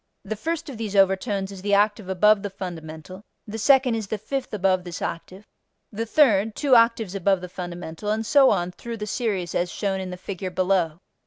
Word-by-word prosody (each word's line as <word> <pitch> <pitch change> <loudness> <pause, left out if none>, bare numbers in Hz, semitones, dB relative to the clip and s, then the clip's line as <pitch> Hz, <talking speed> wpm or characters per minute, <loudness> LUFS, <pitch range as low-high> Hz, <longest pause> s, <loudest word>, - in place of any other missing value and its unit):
The 215 +2 -3
first 325 +7 -3
of 270 -5 -7
these 210 -3 -4
overtones 195 +1 +2
is 195 -2 -9
the 205 +1 +2
octave 205 -1 +1
above 210 +2 +4
the 205 - -4
fundamental; 175 -1 -8 0.2
the 220 +1 -6
second 265 +1 +4
is 220 -3 -3
the 220 - -2
fifth 265 +6 -4
above 185 -3 +1
this 175 -1 -7
octave; 185 +4 -6 0.5
the 225 +2 -4
third, 220 -6 +3
two 280 -4 +3
octaves 230 -4 +3
above 195 -1 +2
the 180 - -7
fundamental, 175 +1 -6
and 220 +1 0
so 275 +2 +6
on 175 +1 0
through 230 +5 -7
the 210 - -4
series 210 -5 -2
as 175 0 -1
shown 195 -2 -2
in 190 -1 -5
the 180 - -6
figure 185 0 -5
below. 180 -2 0
200 Hz, 200 wpm, -24 LUFS, 185-220 Hz, 0.5 s, so